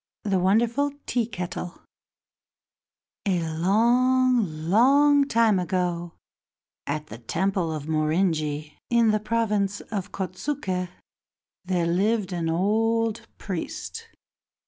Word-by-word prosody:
The 195 -3 +1
Wonderful 235 +9 +2
Tea 235 -3 0
Kettle 180 -4 -6 1.5
A 185 -3 +2
long, 230 -1 +2
long 280 +8 +5
time 225 -6 +3
ago, 175 -2 -2 0.7
at 150 +1 -2
the 115 -5 -10
temple 175 - -1
of 155 -2 -4
Morinji, 155 -1 -1
in 235 -2 +4
the 215 - +1
province 210 -3 0
of 200 -4 -5
Kotsuke, 185 -1 -3 0.8
there 180 -2 0
lived 195 +3 +1
an 165 -2 -1
old 225 +5 +1
priest. 210 - -5
195 Hz, 100 wpm, -25 LUFS, 175-230 Hz, 1.5 s, long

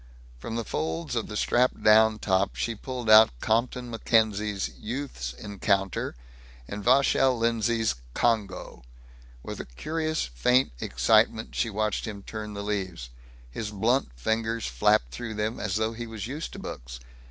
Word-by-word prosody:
From 115 - -5
the 115 -1 -2
folds 80 +7 -3
of 115 - -1
the 105 - -5
strapped 125 +4 +2
down 110 0 +6
top 95 -1 +1
she 115 - -1
pulled 125 +2 -6
out 110 +1 +9
Compton 120 - 0
Mackenzie's 110 -3 +1
Youth's 110 - -4
Encounter, 100 - -1 0.5
and 100 0 -6
Vachel 135 +1 +4
Lindsay's 115 - +1 0.2
Congo. 110 - -1 0.6
With - - -6
a - - -5
curious 155 - -2
faint 100 - +2
excitement 110 - +2
she 115 - 0
watched 105 0 -1
him 100 -2 -7
turn 105 -1 -6
the 100 - -4
leaves. 95 -11 -3 0.4
His 105 - -4
blunt 115 - +1
fingers 115 - -1
flapped - - +2
through 110 - -5
them 105 +2 -2
as 105 -3 -2
though 110 +1 0
he 120 +1 -6
was 110 -2 -6
used 145 +7 -5
to - - -8
books. - - -7
110 Hz, 150 wpm, -27 LUFS, 100-115 Hz, 0.6 s, out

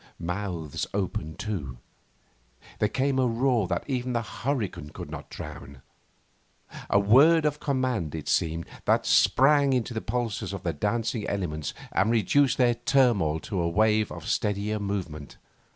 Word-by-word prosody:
Mouths 90 -4 -4
opened 85 -5 -3
too. 95 - -4 1.0
There 105 - +2
came 135 +2 0
a 130 - +3
roar 120 -3 +1
that 85 -1 -1
even 125 -2 -2
the 115 -1 0
hurricane 110 - -3
could - - -9
not - - -8
drown 70 -2 -9 1.1
a - - +4
word 140 +11 +5
of 150 0 0
command, 130 - -1
it 80 - -6
seemed, 80 0 0 0.2
that - - +2
sprang 140 0 +4
into 125 -1 -1
the 110 - -3
pulses 115 -2 -3
of - - -6
the - - -1
dancing 105 +6 -1
elements 80 -7 -3 0.2
and 100 - +2
reduced 120 +5 +3
their 125 -2 +4
turmoil 120 - +2
to 95 -3 -3
a 85 - 0
wave 110 +3 +2
of - - -8
steadier 105 +1 -1
movement. 90 -8 -5
105 Hz, 150 wpm, -27 LUFS, 90-125 Hz, 1.1 s, word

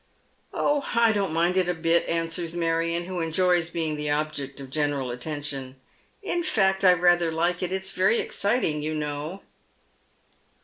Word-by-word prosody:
" - - -40
Oh, 290 -1 +1
I 230 -1 +5
don't 200 -4 0
mind 170 +3 +1
it 185 -1 +2
a 180 - 0
bit," 165 +1 +1
answers 165 0 -2
Marion, 165 0 0
who 185 0 -4
enjoys 170 +1 +2
being 160 -3 -2
the 150 0 -3
object 145 -2 -2
of 135 -1 -9
general 145 -3 -1
attention. 135 0 -5 0.2
" - - -35 0.2
In 350 -3 -1
fact, 195 - +1
I 185 -1 +8
rather 175 -1 +3
like 170 +2 0
it. 180 -1 -2
It's 190 0 -2
very 190 +4 +2
exciting, 200 -8 0
you 155 +1 -2
know." 150 +5 -4
165 Hz, 170 wpm, -25 LUFS, 150-185 Hz, 0.2 s, I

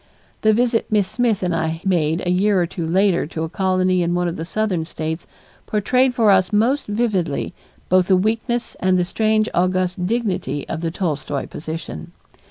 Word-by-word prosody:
The 215 - +4
visit 235 +1 +1
Miss 205 -3 +2
Smith 220 -3 0
and 180 -2 0
I 160 0 -1
made 165 -3 +1
a 175 - +1
year 195 +2 +3
or 175 - +2
two 170 -1 -5
later 185 -1 +2
to 160 0 -4
a 160 - -3
colony 185 0 +1
in 175 0 0
one 175 0 0
of 170 - -3
the 160 - -5
southern 190 -3 -1
States 160 +1 -5 0.4
portrayed 250 +5 +2
for 225 -4 +4
us 185 -1 +3
most 235 +7 +2
vividly 205 -8 -1 0.3
both 185 0 +3
the 190 - +4
weakness 225 +4 -1
and 185 0 +2
the 180 - +1
strange 215 +3 +1
august 185 0 0
dignity 205 -9 -2
of 160 - -4
the 165 - -1
Tolstoy 150 -5 -3
position. 155 - -7
185 Hz, 180 wpm, -20 LUFS, 170-215 Hz, 0.4 s, The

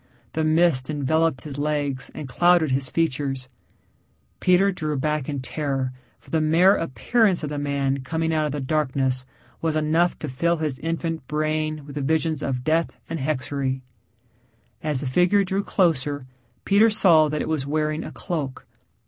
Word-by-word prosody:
The 160 - 0
mist 155 -4 +3
enveloped 155 -1 +1
his 145 -2 -7
legs 145 -3 -1
and 150 - -6
clouded 175 +2 +3
his 130 0 0
features. 135 -5 -1 0.9
Peter 185 +2 +4
drew 155 -5 -3
back 150 +1 -1
in 140 -2 -3
terror, 135 -2 -2 0.2
for - - -19
the 160 - +2
mere 170 +5 +5
appearance 180 - +1
of 150 - -2
the 145 -1 -3
man 140 -1 0
coming 160 +4 -2
out 155 -1 +1
of - - -4
the 145 - -3
darkness 130 -3 0 0.4
was 160 -1 0
enough 160 +3 +2
to 155 - -5
fill 170 +6 0
his 150 -5 -3
infant 165 -2 -3
brain 155 0 -1
with 145 0 -9
visions 155 +1 0
of 130 -3 -2
death 160 +3 0
and 165 - -2
hexerei. 135 -1 -2 1.0
As 150 -4 +1
the - - -4
figure 180 +9 +3
drew 195 +1 -1
closer 145 -8 +1 0.4
Peter 205 +3 +5
saw 170 -8 +5
that 150 0 -1
it - - -5
was 155 -4 -1
wearing 155 +1 -1
a - - -7
cloak. 150 -8 -4
155 Hz, 165 wpm, -24 LUFS, 135-165 Hz, 1.0 s, mere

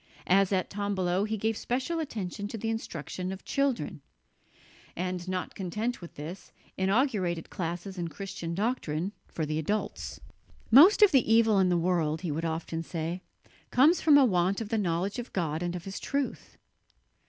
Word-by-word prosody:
As 195 +1 +4
at 185 -2 0
Tombolo, 195 -2 0
he 220 0 -2
gave 220 +2 0
special 260 +10 -2
attention 205 - -4
to 225 - -6
the 225 +1 -2
instruction 185 -3 -4
of 190 - -8
children; 270 - -1 0.9
and, 180 0 -3
not 185 -2 -3
content 210 +6 -3
with 170 - -10
this, 160 +6 -8 0.2
inaugurated 190 - 0
classes 180 +1 -4
in 170 - -2
Christian 170 0 -5
doctrine 195 -5 -1 0.2
for 160 - -3
the 155 +1 -1
adults. 205 +7 -3 0.5
"Most 345 - +8
of 415 - +7
the 260 -6 +3
evil 225 -2 +5
in 185 -1 +4
the 175 - +3
world," 165 -3 +1
he 175 -4 -2
would 160 +3 -2
often 165 0 -3
say, 165 +2 -4 0.5
"comes 305 +7 +5
from 300 -3 +7
a 280 - +7
want 185 -2 +2
of 225 -3 -5
the 225 - +1
knowledge 185 +3 -1
of 240 - -7
God 160 -3 -1
and 175 0 -2
of 175 - -6
His 195 0 -5
truth." 280 -1 -3
190 Hz, 170 wpm, -29 LUFS, 170-225 Hz, 0.9 s, Most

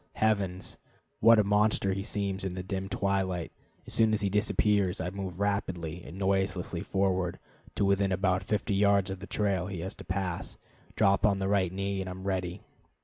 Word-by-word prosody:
Heavens, 100 -4 -1 0.4
what 115 +1 +7
a 105 - +5
monster 105 -1 +2
he 95 - -2
seems 100 -2 -2
in 95 -2 -3
the 90 - -4
dim 95 +1 -4
twilight! 95 -3 -1 0.3
As - - -5
soon 110 -1 +4
as 105 - -2
he 100 -2 0
disappears 105 -2 +2
I 90 - -2
move 95 -2 -6
rapidly 90 -5 -2
and 85 - -10
noiselessly 95 -3 0
forward 95 -2 0 0.4
to 100 - +1
within 100 0 +2
about 95 0 +1
fifty 105 0 -1
yards 100 -1 +3
of 95 - -5
the 100 - -8
trail 95 -4 0
he 95 -4 -5
has 95 +3 -4
to - - -9
pass, 95 -2 -3 0.4
drop 100 0 +3
on 105 -3 +4
the 95 0 -1
right 95 -3 +2
knee, 100 +1 -2
and 95 - -4
am 95 +1 -7
ready. 95 -1 -2
95 Hz, 190 wpm, -29 LUFS, 95-100 Hz, 0.4 s, what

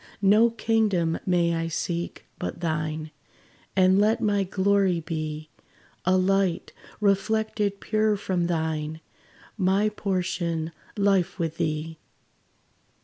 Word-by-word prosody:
No 210 +4 +6
kingdom 215 -8 +1
may 170 -2 +2
I 165 0 -1
seek, 170 +1 -3
but - - -4
thine; 155 -1 -2 0.6
And 190 0 +5
let 215 +3 +3
my 205 -3 +1
glory 190 -1 +2
be 155 -1 -5 0.6
A 185 +1 +4
light, 190 -1 +1 0.3
reflected 210 0 +1
pure 215 -1 +1
from 180 -3 -1
thine 160 -2 -2 0.6
My 195 +3 +3
portion, 175 -5 -2 0.3
life 195 -4 +2
with 165 -3 -2
thee! 155 +1 -2
185 Hz, 105 wpm, -26 LUFS, 165-200 Hz, 0.6 s, No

